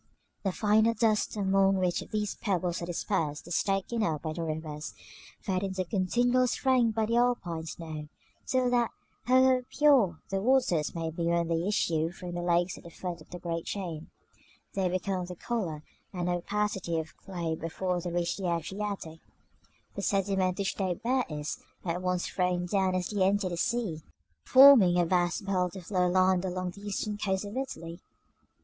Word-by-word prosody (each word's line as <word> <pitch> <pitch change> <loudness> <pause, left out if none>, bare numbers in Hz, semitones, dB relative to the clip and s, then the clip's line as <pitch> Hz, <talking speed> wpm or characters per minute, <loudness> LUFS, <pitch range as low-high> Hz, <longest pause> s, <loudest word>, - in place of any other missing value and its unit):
The 195 - 0
finer 220 +3 +3
dust 215 -1 +1
among 195 -1 +3
which 180 -2 +1
these 210 -1 -1
pebbles 180 -3 -1
are 170 - -4
dispersed 165 -4 -2
is 175 - +1
taken 195 +4 -1
up 160 -8 -1
by 155 -1 -2
the 170 - -5
rivers, 155 -1 -5 0.4
fed 185 -3 -1
into 190 -1 -2
continual 245 +7 +2
strength 245 -3 +2
by 220 -1 +2
the 230 +2 +1
Alpine 180 -10 0
snow, 155 -2 -6 0.4
so 255 -2 +1
that, 240 -2 +2 0.4
however 255 0 +4
pure 265 - +4
their 195 0 -1
waters 215 - +2
may 165 -1 -2
be 165 +1 -2
when 170 0 +1
they 165 +2 0
issue 165 -6 +1
from 175 0 -8
the 175 - -3
lakes 175 +1 +1
at - - -17
the 170 - -10
foot 170 0 -6
of - - -16
the 180 - -7
great 170 -1 -4
chain, 170 -5 -5 0.6
they 190 -2 +1
become 185 +1 -1
of 175 - -5
the 180 - -7
color 175 -8 -3 0.3
and 180 -2 -3
opacity 190 -1 -1
of 160 -1 -5
clay 175 -4 -4
before 175 +3 -2
they 175 - -4
reach 175 0 -1
the 190 -3 -2
Adriatic; 190 -1 -4 0.7
the 200 - -5
sediment 195 -2 +1
which 195 -1 -2
they 185 -3 0
bear 250 +5 0
is 150 -1 -4 0.3
at 175 +1 -1
once 180 -1 0
thrown 180 -1 0
down 190 0 +1
as 180 -1 -1
they 205 -2 -2
enter 195 0 +2
the 175 - -3
sea, 185 -4 -1 0.4
forming 260 -10 +8
a 175 - +3
vast 175 +3 +1
belt 185 -2 0
of 185 0 -9
low 180 -2 +3
land 185 0 +3
along 185 -1 -2
the 200 - -13
eastern 205 +1 -3
coast 190 0 -1
of 205 +3 -7
Italy. 170 -11 -5
185 Hz, 180 wpm, -29 LUFS, 170-210 Hz, 0.7 s, forming